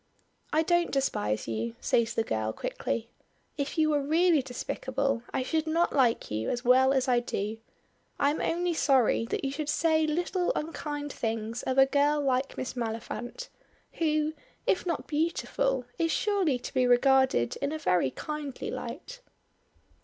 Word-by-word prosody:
"I 315 Hz, +1 st, +3 dB
don't 345 Hz, +1 st, +2 dB
despise 110 Hz, -, -1 dB
you," 115 Hz, +1 st, -3 dB
says 235 Hz, -1 st, +1 dB
the 225 Hz, -, +2 dB
girl, 110 Hz, -, -2 dB
quickly. -, -, -3 dB, 0.4 s
"If 285 Hz, +1 st, -3 dB
you 310 Hz, -1 st, +3 dB
were 295 Hz, -1 st, +2 dB
really 320 Hz, +2 st, +3 dB
despicable 260 Hz, +1 st, -2 dB
I 260 Hz, -, -1 dB
should 315 Hz, +4 st, -1 dB
not 335 Hz, +2 st, +1 dB
like 245 Hz, -, +2 dB
you 110 Hz, +1 st, -2 dB
as 245 Hz, +1 st, -3 dB
well 260 Hz, +2 st, +5 dB
as 265 Hz, -1 st, +1 dB
I 245 Hz, -1 st, +4 dB
do; 220 Hz, -2 st, -3 dB, 0.6 s
I 280 Hz, -, +3 dB
am 305 Hz, -, -3 dB
only 350 Hz, +1 st, 0 dB
sorry 260 Hz, -7 st, +3 dB
that -, -, -2 dB
you 270 Hz, -, -1 dB
should 295 Hz, +1 st, -4 dB
say 315 Hz, -1 st, +2 dB
little 350 Hz, +3 st, 0 dB
unkind 295 Hz, -2 st, -4 dB
things 225 Hz, +1 st, -3 dB
of 260 Hz, -, -2 dB
a 270 Hz, -, +8 dB
girl 290 Hz, +2 st, +2 dB
like 270 Hz, -1 st, 0 dB
Miss 255 Hz, -, -3 dB
Maliphant, 240 Hz, -, -5 dB, 0.5 s
who, 310 Hz, -1 st, +1 dB, 0.3 s
if 370 Hz, -, +1 dB
not 340 Hz, -, -2 dB
beautiful, 330 Hz, -, 0 dB
is 330 Hz, -1 st, +2 dB
surely 385 Hz, -10 st, +1 dB
to 245 Hz, -, -8 dB
be 255 Hz, -1 st, +3 dB
regarded 260 Hz, -, +3 dB
in 280 Hz, +1 st, -2 dB
a 315 Hz, -, -2 dB
very 180 Hz, -, +2 dB
kindly 295 Hz, -, -5 dB
light." 360 Hz, -, -7 dB
275 Hz, 160 wpm, -28 LUFS, 245-315 Hz, 0.6 s, a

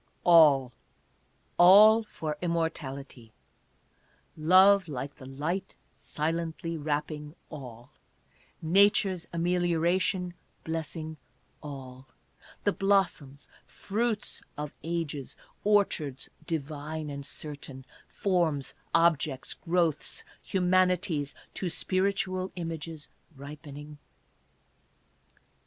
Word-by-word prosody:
" -, -, -40 dB
All, 150 Hz, -7 st, +6 dB, 0.9 s
all 210 Hz, +5 st, +9 dB
for 160 Hz, -8 st, -5 dB
immortality, 140 Hz, -8 st, -3 dB, 1.0 s
Love 185 Hz, +4 st, +6 dB
like 140 Hz, -1 st, -5 dB
the 130 Hz, -, -11 dB
light 150 Hz, +8 st, -3 dB, 0.2 s
silently 165 Hz, +1 st, -3 dB
wrapping 150 Hz, 0 st, -3 dB, 0.2 s
all, 125 Hz, -6 st, -10 dB, 0.7 s
Nature's 190 Hz, +1 st, +3 dB
amelioration 175 Hz, +1 st, +1 dB, 0.3 s
blessing 160 Hz, 0 st, -4 dB, 0.4 s
all, 135 Hz, -3 st, -9 dB, 0.6 s
The 205 Hz, -, +3 dB
blossoms, 190 Hz, -9 st, 0 dB, 0.2 s
fruits 220 Hz, +1 st, -2 dB, 0.2 s
of 150 Hz, 0 st, -5 dB
ages, 160 Hz, -5 st, -4 dB, 0.3 s
orchards 190 Hz, -10 st, +1 dB, 0.2 s
divine 155 Hz, 0 st, -4 dB
and 140 Hz, 0 st, -6 dB
certain, 140 Hz, -2 st, -7 dB, 0.2 s
Forms, 170 Hz, -8 st, 0 dB, 0.2 s
objects, 155 Hz, -5 st, +2 dB
growths, 170 Hz, -3 st, -1 dB, 0.2 s
humanities, 180 Hz, -5 st, +1 dB, 0.2 s
to 185 Hz, -, -2 dB
spiritual 185 Hz, +1 st, -1 dB
images 165 Hz, -3 st, -6 dB, 0.3 s
ripening. 145 Hz, +1 st, -10 dB
160 Hz, 75 wpm, -29 LUFS, 145-180 Hz, 1.0 s, all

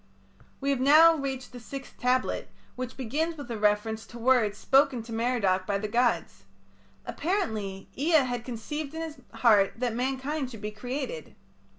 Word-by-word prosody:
We 280 Hz, 0 st, 0 dB
have 275 Hz, -, 0 dB
now 310 Hz, +5 st, +7 dB
reached 270 Hz, -3 st, -4 dB
the 250 Hz, -, -9 dB
sixth 270 Hz, +3 st, -9 dB
tablet, 255 Hz, +1 st, 0 dB, 0.3 s
which 255 Hz, 0 st, -5 dB
begins 305 Hz, +7 st, -2 dB
with 280 Hz, -5 st, -7 dB
a 230 Hz, -, -3 dB
reference 210 Hz, +1 st, +1 dB
to 240 Hz, -, -11 dB
words 235 Hz, -4 st, +3 dB
spoken 270 Hz, -2 st, +3 dB
to 230 Hz, 0 st, -8 dB
Merodach 225 Hz, -6 st, +1 dB
by 200 Hz, -, +1 dB
the 215 Hz, +2 st, -3 dB
gods. 210 Hz, -, 0 dB, 0.6 s
Apparently 220 Hz, -, -2 dB
Ea 305 Hz, 0 st, +3 dB
had 245 Hz, -2 st, -3 dB
conceived 280 Hz, +6 st, -5 dB
in 325 Hz, -, -3 dB
his 315 Hz, -2 st, -7 dB
heart 225 Hz, -4 st, +4 dB
that 245 Hz, -1 st, -1 dB
mankind 265 Hz, +3 st, -2 dB
should 225 Hz, -4 st, -9 dB
be 210 Hz, 0 st, -4 dB
created. 245 Hz, -, -5 dB
250 Hz, 165 wpm, -28 LUFS, 220-275 Hz, 0.6 s, now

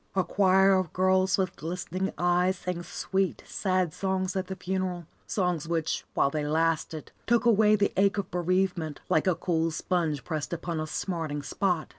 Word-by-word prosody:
A 190 Hz, -, +3 dB
choir 190 Hz, +2 st, +4 dB
of 185 Hz, -4 st, +1 dB
girls 185 Hz, 0 st, +3 dB
with 185 Hz, -2 st, -1 dB
glistening 180 Hz, +3 st, -3 dB
eyes 180 Hz, +2 st, +2 dB
sang 180 Hz, -1 st, -4 dB
sweet, 185 Hz, +3 st, -2 dB
sad 185 Hz, -4 st, 0 dB
songs 190 Hz, -1 st, -1 dB
at 190 Hz, -1 st, -2 dB
the 190 Hz, -, -4 dB
funeral, 185 Hz, -2 st, -3 dB, 0.2 s
songs 180 Hz, -5 st, -1 dB
which, 165 Hz, -2 st, -1 dB
while 140 Hz, -, +3 dB
they 150 Hz, 0 st, -2 dB
lasted, 160 Hz, 0 st, -1 dB, 0.2 s
took 235 Hz, 0 st, +3 dB
away 215 Hz, -2 st, +5 dB
the 200 Hz, -1 st, +1 dB
ache 195 Hz, +1 st, +3 dB
of 200 Hz, -, -3 dB
bereavement, 180 Hz, -3 st, 0 dB
like 160 Hz, -, +2 dB
a 185 Hz, -, +3 dB
cool 165 Hz, -1 st, 0 dB
sponge 160 Hz, -3 st, -1 dB
pressed 155 Hz, -1 st, -3 dB
upon 170 Hz, -1 st, -3 dB
a 155 Hz, -, -3 dB
smarting 155 Hz, -4 st, -3 dB
spot. 180 Hz, +1 st, -1 dB
180 Hz, 170 wpm, -28 LUFS, 165-190 Hz, 0.2 s, away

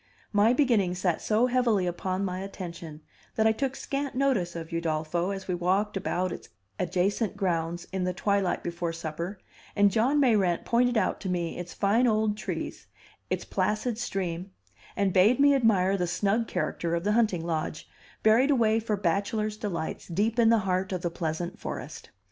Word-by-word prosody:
My 210 Hz, +2 st, +5 dB
beginning 235 Hz, -9 st, +2 dB
sat 180 Hz, -3 st, 0 dB
so 220 Hz, +3 st, +2 dB
heavily 240 Hz, -6 st, +2 dB
upon 185 Hz, +2 st, -2 dB
my 185 Hz, -1 st, -3 dB
attention 170 Hz, -5 st, -7 dB, 0.3 s
that 220 Hz, -, +2 dB
I 220 Hz, -, +6 dB
took 265 Hz, +4 st, -2 dB
scant 275 Hz, -1 st, -3 dB
notice 255 Hz, -11 st, +1 dB
of 165 Hz, 0 st, -6 dB
Udolpho 165 Hz, +2 st, -1 dB
as 195 Hz, -1 st, -5 dB
we 185 Hz, -, -1 dB
walked 190 Hz, +4 st, 0 dB
about 185 Hz, -1 st, -1 dB
its -, -, -8 dB, 0.3 s
adjacent 195 Hz, +4 st, 0 dB
grounds 175 Hz, -3 st, -1 dB
in 190 Hz, -1 st, -1 dB
the 180 Hz, -, 0 dB
twilight 195 Hz, 0 st, 0 dB
before 170 Hz, -1 st, -3 dB
supper, 170 Hz, +4 st, -5 dB, 0.4 s
and 205 Hz, 0 st, +4 dB
John 250 Hz, +8 st, +2 dB
Mayrant 205 Hz, -10 st, +2 dB
pointed 245 Hz, 0 st, +2 dB
out 190 Hz, -, +1 dB
to 190 Hz, -, -3 dB
me 175 Hz, -2 st, -2 dB
its 175 Hz, 0 st, -7 dB
fine 220 Hz, +5 st, +3 dB
old 215 Hz, -2 st, +2 dB
trees, 190 Hz, -5 st, -5 dB, 0.4 s
its -, -, -2 dB
placid 215 Hz, +2 st, -1 dB
stream, 185 Hz, -5 st, -3 dB, 0.5 s
and 195 Hz, -2 st, +1 dB
bade 205 Hz, +7 st, +5 dB
me 285 Hz, 0 st, +6 dB
admire 200 Hz, -7 st, +3 dB
the 180 Hz, -2 st, -1 dB
snug 205 Hz, +6 st, 0 dB
character 170 Hz, 0 st, -2 dB
of 170 Hz, -, -2 dB
the 205 Hz, -, +1 dB
hunting 210 Hz, -7 st, +2 dB
lodge, 160 Hz, -1 st, -3 dB, 0.4 s
buried 230 Hz, +6 st, +5 dB
away 225 Hz, -5 st, +3 dB
for 215 Hz, -2 st, -1 dB
bachelors' 205 Hz, +3 st, 0 dB
delights 195 Hz, -7 st, -4 dB
deep 210 Hz, +7 st, 0 dB
in 230 Hz, -1 st, +6 dB
the 230 Hz, -, +5 dB
heart 185 Hz, 0 st, 0 dB
of 185 Hz, -2 st, -3 dB
the 175 Hz, -, -1 dB
pleasant 165 Hz, 0 st, -3 dB
forest. -, -, -7 dB
195 Hz, 175 wpm, -27 LUFS, 175-220 Hz, 0.5 s, I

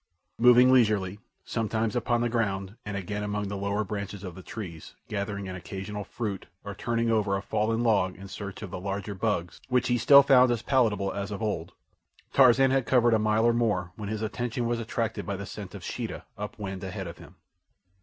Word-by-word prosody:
Moving 125 Hz, +2 st, +7 dB
leisurely, 105 Hz, -5 st, +3 dB, 0.3 s
sometimes 110 Hz, -1 st, -1 dB
upon 120 Hz, 0 st, +1 dB
the 120 Hz, -, +2 dB
ground 100 Hz, -4 st, -1 dB
and 105 Hz, -1 st, -3 dB
again 105 Hz, +2 st, -4 dB
among 105 Hz, -1 st, -2 dB
the 100 Hz, -, -4 dB
lower 100 Hz, +2 st, -1 dB
branches 100 Hz, -1 st, -5 dB
of 90 Hz, -3 st, -6 dB
the 95 Hz, -, -10 dB
trees, 90 Hz, -5 st, -8 dB
gathering 100 Hz, -1 st, -3 dB
an 95 Hz, -, -5 dB
occasional 95 Hz, +3 st, -6 dB
fruit 105 Hz, -3 st, -5 dB, 0.2 s
or 100 Hz, -, -5 dB
turning 115 Hz, +2 st, 0 dB
over 105 Hz, -3 st, +2 dB
a -, -, -4 dB
fallen 110 Hz, +2 st, 0 dB
log 100 Hz, -5 st, +2 dB
in 100 Hz, +1 st, -10 dB
search 100 Hz, +2 st, -7 dB
of 95 Hz, -, -7 dB
the -, -, -5 dB
larger 100 Hz, +1 st, -4 dB
bugs, 95 Hz, -4 st, -2 dB
which 125 Hz, -1 st, +2 dB
he 120 Hz, 0 st, +2 dB
still 140 Hz, +4 st, +8 dB
found 130 Hz, -2 st, +6 dB
as 120 Hz, -2 st, 0 dB
palatable 105 Hz, -6 st, +2 dB
as 100 Hz, 0 st, -4 dB
of 105 Hz, +1 st, -5 dB
old, 85 Hz, -6 st, -2 dB, 0.6 s
Tarzan 130 Hz, 0 st, +6 dB
had 135 Hz, -2 st, +1 dB
covered 120 Hz, -2 st, +4 dB
a 110 Hz, -, +4 dB
mile 110 Hz, +1 st, +2 dB
or 120 Hz, -, +5 dB
more 105 Hz, -7 st, 0 dB
when 105 Hz, -2 st, -6 dB
his 110 Hz, 0 st, -3 dB
attention 120 Hz, +2 st, -2 dB
was 120 Hz, 0 st, 0 dB
attracted 115 Hz, 0 st, -2 dB
by 100 Hz, -, -3 dB
the 100 Hz, +1 st, -6 dB
scent 100 Hz, -1 st, -8 dB
of -, -, -9 dB
Sheeta -, -, -5 dB
up 105 Hz, 0 st, -6 dB
wind 95 Hz, -3 st, -5 dB
ahead 95 Hz, 0 st, -5 dB
of 85 Hz, 0 st, -8 dB
him. -, -, -14 dB
105 Hz, 205 wpm, -28 LUFS, 100-115 Hz, 0.6 s, still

